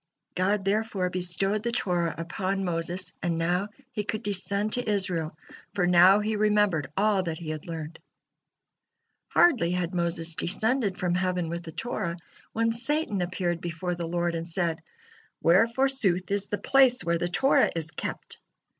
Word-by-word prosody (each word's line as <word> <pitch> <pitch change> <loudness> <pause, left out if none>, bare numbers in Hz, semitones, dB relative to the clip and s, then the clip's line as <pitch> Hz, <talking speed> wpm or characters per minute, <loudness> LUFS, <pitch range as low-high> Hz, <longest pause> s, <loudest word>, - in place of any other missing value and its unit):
God 195 +2 0
therefore 200 -3 0
bestowed 185 +3 0
the 235 +2 -2
Torah 175 -8 0
upon 190 +3 -2
Moses, 175 +2 -2
and 170 -2 -1
now 175 +4 0 0.2
he 210 -4 -3
could 210 +1 -3
descend 200 +1 -1
to 245 -3 0
Israel, 180 -6 -1 0.4
for 180 -3 +2
now 180 +3 +6
he 215 +1 -1
remembered 205 -9 +2
all 205 -1 +3
that 165 -3 -4
he 160 -2 -5
had 155 +1 -7
learned. 160 -1 -6 1.3
Hardly 255 - +4
had 180 0 -1
Moses 170 -1 0
descended 210 +4 0
from 180 -2 0
heaven 180 -2 0
with 170 +1 -4
the 165 -2 -9
Torah, 175 -3 -3 0.3
when 230 0 +1
Satan 240 - -1
appeared 175 -1 -2
before 175 +1 -3
the 170 -1 -4
Lord 175 0 -1
and 165 0 -4
said: 170 -1 -1 0.6
"Where, 185 +7 +5
forsooth, 230 -8 0
is 200 0 0
the 205 - -2
place 255 +1 +4
where 170 0 0
the 175 - 0
Torah 265 +10 +3
is 165 -1 -3
kept?" 155 - -6
185 Hz, 160 wpm, -27 LUFS, 170-210 Hz, 1.3 s, now